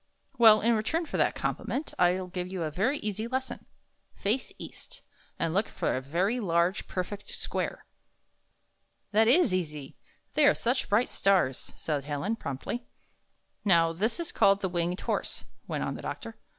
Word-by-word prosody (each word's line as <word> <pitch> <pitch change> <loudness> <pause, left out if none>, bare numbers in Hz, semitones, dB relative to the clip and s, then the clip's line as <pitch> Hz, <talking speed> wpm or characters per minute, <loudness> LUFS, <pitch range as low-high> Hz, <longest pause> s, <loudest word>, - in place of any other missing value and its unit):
"Well, 220 -2 +8
in 235 +2 +3
return 310 +11 0
for - - -4
that - - +2
compliment, 290 +4 -3
I'll 180 +1 +3
give 180 0 -4
you 185 -2 -3
a 155 - -2
yery 220 - +1
easy 215 +2 -2
lesson. 260 +1 -4 0.5
Face 220 +6 -1
east, - - -9 0.3
and 165 -1 -1
look 200 +4 +2
for - - -1
a 130 - -2
very 180 - 0
large, 175 -2 +1
perfect 195 +3 -4
square." - - -3 1.3
"That 220 +2 +4
is 260 - +5
easy; 150 -6 -3 0.4
they 300 -2 +5
are 295 - +5
such 245 +2 0
bright 220 +5 +3
stars," 185 -10 +1
said 145 -3 -2
Helen, 150 +9 -1
promptly. 140 - -4 0.9
51 190 -5 +5
''Now, 165 0 +2
this 215 - 0
is 335 - -2
called 200 0 +4
the 190 - 0
Winged 175 +1 -1
Horse," - - -2 0.2
went - - -2
on - - -2
the - - -7
doctor. - - -6
195 Hz, 165 wpm, -29 LUFS, 170-230 Hz, 1.3 s, Well